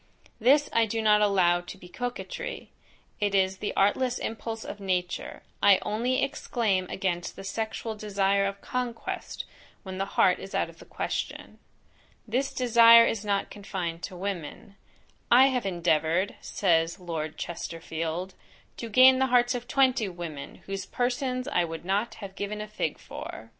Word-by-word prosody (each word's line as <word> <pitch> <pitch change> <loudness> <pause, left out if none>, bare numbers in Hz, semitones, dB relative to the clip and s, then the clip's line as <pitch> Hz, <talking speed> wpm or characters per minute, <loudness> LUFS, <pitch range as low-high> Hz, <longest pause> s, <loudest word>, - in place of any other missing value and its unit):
This 280 +6 +4
I 230 -1 +3
do 225 +2 -2
not 210 -1 +4
allow 185 -4 +3
to 175 - -10
be 180 - -13
coquetry, 245 +6 -5 0.5
it 205 -1 +1
is 190 0 +2
the 205 - -3
artless 245 +6 +2
impulse 225 0 -5
of 205 - -7
nature, 180 -2 -3 0.2
I 200 -2 +7
only 235 +5 0
exclaim 220 -9 0
against 175 -2 -2
the - - -9
sexual 220 +2 -3
desire 200 -2 +1
of 200 0 -6
conquest, 250 -2 -4 0.4
when 190 -1 -6
the 195 - -1
heart - - +5
is - - -8
out - - 0
of - - -22
the - - -13
question. - - -4 0.7
This 260 +5 0
desire 230 -1 +7
is 220 -2 -1
not 200 -1 -1
confined 180 -5 -5
to 185 - -9
women; 195 +1 -5 0.5
"I 260 +3 +7
have 250 -6 -1
endeavoured," 170 +1 +1
says 165 -3 +1
Lord 160 -3 -4
Chesterfield, 165 +1 -4 0.4
"to 230 - -6
gain 260 +4 +7
the 265 - +3
hearts 245 0 +3
of 245 -1 -5
twenty 255 -6 +2
women, 170 -5 -8
whose 195 -1 -5
persons 255 +2 -1
I 180 -11 +2
would 165 0 -6
not 200 +5 0
have 200 -3 -9
given 205 +1 -4
a 210 - -5
fig 215 - -3
for." - - -9
200 Hz, 160 wpm, -27 LUFS, 180-235 Hz, 0.7 s, I